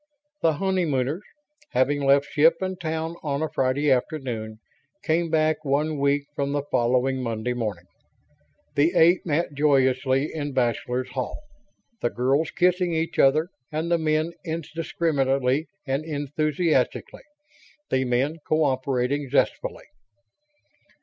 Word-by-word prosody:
The 160 - +3
honeymooners, 160 -4 0 0.5
having 145 +2 +2
left 140 +1 +4
ship 155 +3 +4
and 185 -1 -4
town 160 +1 -3
on 145 0 -2
a 160 - -1
Friday 135 +2 +1
afternoon, 125 -5 -2 0.5
came 165 +1 +1
back 155 0 +1
one 150 +1 0
week 140 +1 +2
from 140 0 -1
the 145 -1 -1
following 130 +2 +1
Monday 115 0 -2
morning. 105 -7 -4 0.9
The 160 +5 +2
eight 170 +2 +5
met 155 0 0
joyously 135 -1 +2
in 145 -3 -4
Bachelors' 125 +1 -1
Hall; 130 - -4 0.6
the - - +1
girls 135 +7 +1
kissing 180 -1 +1
each 160 +1 -2
other 155 +5 +4 0.2
and 160 +2 -2
the 170 - +3
men 155 +1 +1
indiscriminately 155 -4 -1 0.2
and 135 +2 -1
enthusiastically; 150 -1 -1 0.7
the 130 - +2
men 130 +5 0
cooperating 135 -2 0
zestfully. - - 0
145 Hz, 120 wpm, -25 LUFS, 130-160 Hz, 0.9 s, eight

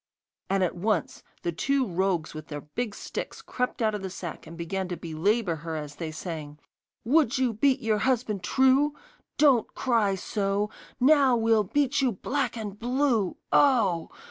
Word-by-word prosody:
And 195 -1 +2
at 180 - 0
once 190 -1 -1 0.2
the 170 - 0
two 270 - +1
rogues 180 -4 -1
with 155 -1 -8
their 145 -1 -6
big 210 +9 -4
sticks - - -6
crept 250 -1 -2
out 215 -1 +2
of 210 - -3
the 190 - -4
sack, 175 -4 -7
and 165 +1 -10
began 185 +3 -3
to 175 -1 -4
belabour 170 +3 0
her 160 +1 -5
as 150 -2 -6
they 165 -2 -4
sang: 155 -2 -6 0.5
'Would 265 -1 +3
you 255 -3 +1
beat 265 +4 +2
your 220 -3 +1
husband 235 -6 0
true? 270 +3 +3 0.4
Don't 270 -7 +4
cry 225 -6 +2
so! 200 +2 -1 0.3
Now 270 -2 +5
we'll 225 -2 +3
beat 285 +6 +1
you 255 -4 +2
black 260 +5 -2
and 205 -2 -6
blue! 245 -5 +1
Oh! 230 - +3
210 Hz, 170 wpm, -27 LUFS, 175-255 Hz, 0.5 s, Now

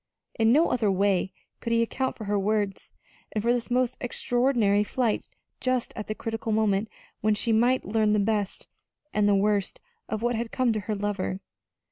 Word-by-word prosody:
In 225 0 +5
no 310 +7 +4
other 220 -4 +2
way 190 -1 +1 0.3
could 235 - -4
he 230 0 +4
account 260 +3 -2
for 220 - -7
her 205 0 0
words, 205 -1 -1 0.4
and 215 - -1
for 235 +1 +3
this 245 0 -2
most 250 0 +1
extraordinary 240 -4 +2
flight 230 +1 -1 0.3
just 255 -2 -1
at 210 - -5
the 215 - -3
critical 225 0 -4
moment 215 -1 +1 0.3
when 215 0 +2
she 230 +2 0
might 245 +4 +3
learn 215 +1 +2
the - - +3
best 205 -1 -1 0.5
and 210 -1 +3
the 200 - +4
worst 200 0 +1 0.3
of 220 +1 -3
what 240 0 +2
had 230 0 -3
come 250 -3 +2
to 215 - -1
her 210 +1 -3
lover. 200 -2 -2
220 Hz, 185 wpm, -27 LUFS, 205-235 Hz, 0.5 s, In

